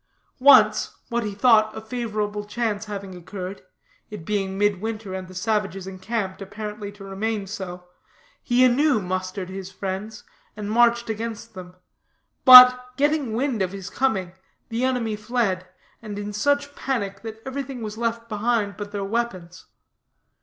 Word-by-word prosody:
Once, 280 Hz, +2 st, +5 dB
what 235 Hz, -1 st, -1 dB
he 205 Hz, -2 st, -4 dB
thought 215 Hz, -1 st, +4 dB
a -, -, -3 dB
favorable 215 Hz, -2 st, -3 dB
chance 215 Hz, 0 st, -2 dB
having 200 Hz, -2 st, -6 dB
occurred 185 Hz, +2 st, -7 dB, 0.5 s
it 210 Hz, -7 st, -9 dB
being 195 Hz, -1 st, -2 dB
midwinter, 205 Hz, 0 st, -1 dB
and 190 Hz, -1 st, -5 dB
the 185 Hz, -, -13 dB
savages 195 Hz, -1 st, -1 dB
encamped, 190 Hz, +1 st, -4 dB
apparently 210 Hz, +1 st, -6 dB
to 205 Hz, -1 st, -13 dB
remain 200 Hz, +2 st, -3 dB
so 180 Hz, -3 st, -7 dB, 0.6 s
he 250 Hz, +1 st, +3 dB
anew 265 Hz, +1 st, +3 dB
mustered 185 Hz, 0 st, -4 dB
his 190 Hz, 0 st, -7 dB
friends, 195 Hz, +3 st, -5 dB, 0.3 s
and 210 Hz, 0 st, -4 dB
marched 235 Hz, +1 st, +3 dB
against 225 Hz, 0 st, -5 dB
them; 180 Hz, -2 st, -10 dB, 0.7 s
but, 250 Hz, -1 st, +11 dB
getting 290 Hz, -4 st, +1 dB
wind 250 Hz, -3 st, -1 dB
of 185 Hz, 0 st, -1 dB
his 195 Hz, -1 st, -7 dB
coming, 195 Hz, -9 st, 0 dB, 0.4 s
the 230 Hz, +2 st, -2 dB
enemy 245 Hz, -4 st, 0 dB
fled, 210 Hz, -4 st, -1 dB, 0.3 s
and 210 Hz, -2 st, -7 dB
in 205 Hz, 0 st, -5 dB
such 285 Hz, +6 st, 0 dB
panic 215 Hz, -8 st, -3 dB
that 220 Hz, -1 st, -8 dB
everything 265 Hz, -2 st, -5 dB
was 210 Hz, -1 st, -5 dB
left 230 Hz, 0 st, -2 dB
behind 215 Hz, -1 st, -1 dB
but 205 Hz, -1 st, -6 dB
their 200 Hz, -1 st, -3 dB
weapons. 190 Hz, -5 st, -4 dB
210 Hz, 145 wpm, -23 LUFS, 195-235 Hz, 0.7 s, but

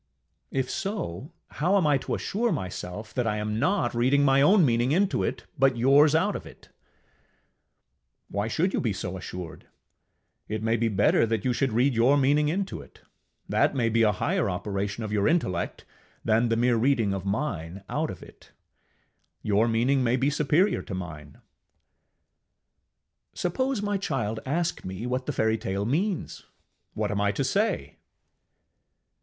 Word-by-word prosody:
ŌĆ£If 130 Hz, -1 st, -1 dB
so, 170 Hz, -, -4 dB, 0.2 s
how 180 Hz, +6 st, +1 dB
am 185 Hz, -, +2 dB
I 145 Hz, -2 st, +3 dB
to -, -, -3 dB
assure 230 Hz, +3 st, -1 dB
myself 95 Hz, -, -5 dB
that 125 Hz, -3 st, -1 dB
I 105 Hz, -1 st, 0 dB
am 105 Hz, +1 st, -2 dB
not 190 Hz, -, +1 dB
reading 130 Hz, +4 st, +3 dB
my 135 Hz, 0 st, +4 dB
own 185 Hz, +4 st, +5 dB
meaning 120 Hz, 0 st, +1 dB
into 190 Hz, +5 st, +2 dB
it, -, -, -2 dB, 0.2 s
but 135 Hz, -2 st, +3 dB
yours 140 Hz, +5 st, +5 dB
out 160 Hz, -, +2 dB
of -, -, -5 dB
it? -, -, -16 dB
ŌĆØ -, -, -41 dB, 1.6 s
Why 100 Hz, +2 st, -1 dB
should 170 Hz, -, 0 dB
you -, -, 0 dB
be 115 Hz, -6 st, 0 dB
so 95 Hz, -1 st, -5 dB
assured? 90 Hz, -2 st, -8 dB, 0.8 s
It 110 Hz, 0 st, -4 dB
may 115 Hz, +1 st, +2 dB
be 115 Hz, 0 st, +1 dB
better 105 Hz, +2 st, +3 dB
that 110 Hz, -2 st, -2 dB
you 125 Hz, -, +2 dB
should 135 Hz, +1 st, 0 dB
read 125 Hz, +5 st, +2 dB
your 120 Hz, +5 st, +4 dB
meaning 145 Hz, +2 st, +3 dB
into 190 Hz, +4 st, -3 dB
it. -, -, -17 dB, 0.5 s
That -, -, +2 dB
may 120 Hz, -3 st, +1 dB
be 115 Hz, +1 st, +2 dB
a 110 Hz, -2 st, +5 dB
higher 155 Hz, -, 0 dB
operation 100 Hz, +3 st, -3 dB
of 110 Hz, -, -5 dB
your 105 Hz, -1 st, +1 dB
intellect 95 Hz, -, -1 dB, 0.4 s
than 115 Hz, +2 st, +2 dB
the 115 Hz, -, +2 dB
mere 120 Hz, 0 st, +3 dB
reading 115 Hz, -4 st, +2 dB
of 95 Hz, -2 st, -4 dB
mine 100 Hz, -, -3 dB
out -, -, -2 dB
of -, -, -8 dB
it: -, -, -17 dB, 0.9 s
your 105 Hz, +2 st, +2 dB
meaning 125 Hz, +4 st, +2 dB
may 120 Hz, 0 st, +2 dB
be 135 Hz, +3 st, +1 dB
superior 150 Hz, +7 st, +2 dB
to 95 Hz, -, -6 dB
mine. 75 Hz, -5 st, -8 dB, 2.0 s
ŌĆ£Suppose 255 Hz, +5 st, -1 dB
my 205 Hz, -1 st, -1 dB
child 120 Hz, -, -2 dB
ask 170 Hz, +5 st, -1 dB
me 95 Hz, +5 st, -6 dB
what 125 Hz, +1 st, -2 dB
the -, -, 0 dB
fairytale 110 Hz, -5 st, -1 dB
means, 175 Hz, -, -2 dB, 0.5 s
what 105 Hz, -1 st, -1 dB
am 100 Hz, 0 st, -1 dB
I 100 Hz, 0 st, +2 dB
to 135 Hz, -, -1 dB
say? 200 Hz, +12 st, -1 dB
120 Hz, 165 wpm, -26 LUFS, 105-150 Hz, 2.0 s, own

